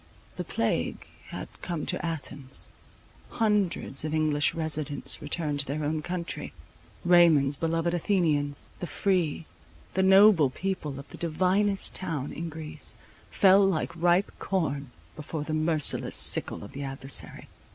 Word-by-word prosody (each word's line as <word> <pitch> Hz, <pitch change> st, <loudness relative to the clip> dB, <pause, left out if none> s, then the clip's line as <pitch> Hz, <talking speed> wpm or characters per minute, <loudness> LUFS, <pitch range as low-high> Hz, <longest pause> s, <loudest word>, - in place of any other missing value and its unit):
The -, -, -4 dB
plague -, -, -2 dB, 0.2 s
had -, -, -7 dB
come 170 Hz, -4 st, -4 dB
to -, -, -3 dB
Athens. 145 Hz, -5 st, -3 dB, 0.6 s
Hundreds 205 Hz, -, 0 dB
of 155 Hz, 0 st, -2 dB
English 150 Hz, -2 st, +2 dB
residents 155 Hz, -3 st, +1 dB
returned 150 Hz, -1 st, -2 dB
to 140 Hz, -, -1 dB
their 150 Hz, +3 st, -3 dB
own 155 Hz, +1 st, -1 dB
country. 175 Hz, +1 st, -5 dB, 0.5 s
Raymond's 165 Hz, -6 st, +5 dB
beloved 165 Hz, +3 st, -1 dB
Athenians, 155 Hz, -6 st, 0 dB
the 175 Hz, -, -4 dB
free, 175 Hz, -5 st, -1 dB, 0.5 s
the 190 Hz, -, +1 dB
noble 190 Hz, -5 st, +6 dB
people 155 Hz, -3 st, -4 dB
of 140 Hz, -, -11 dB
the -, -, -11 dB
divinest 190 Hz, +4 st, 0 dB
town 155 Hz, -7 st, -1 dB
in 165 Hz, +1 st, -5 dB
Greece, 155 Hz, -1 st, -6 dB, 0.3 s
fell 195 Hz, 0 st, +5 dB
like 190 Hz, -5 st, 0 dB
ripe 175 Hz, +3 st, +2 dB
corn 145 Hz, -8 st, -2 dB, 0.3 s
before 150 Hz, 0 st, -5 dB
the 155 Hz, +1 st, -4 dB
merciless 155 Hz, -1 st, +2 dB
sickle -, -, +5 dB
of 100 Hz, -, -10 dB
the 140 Hz, -, -7 dB
adversary. 135 Hz, 0 st, -3 dB
160 Hz, 135 wpm, -27 LUFS, 145-180 Hz, 0.6 s, noble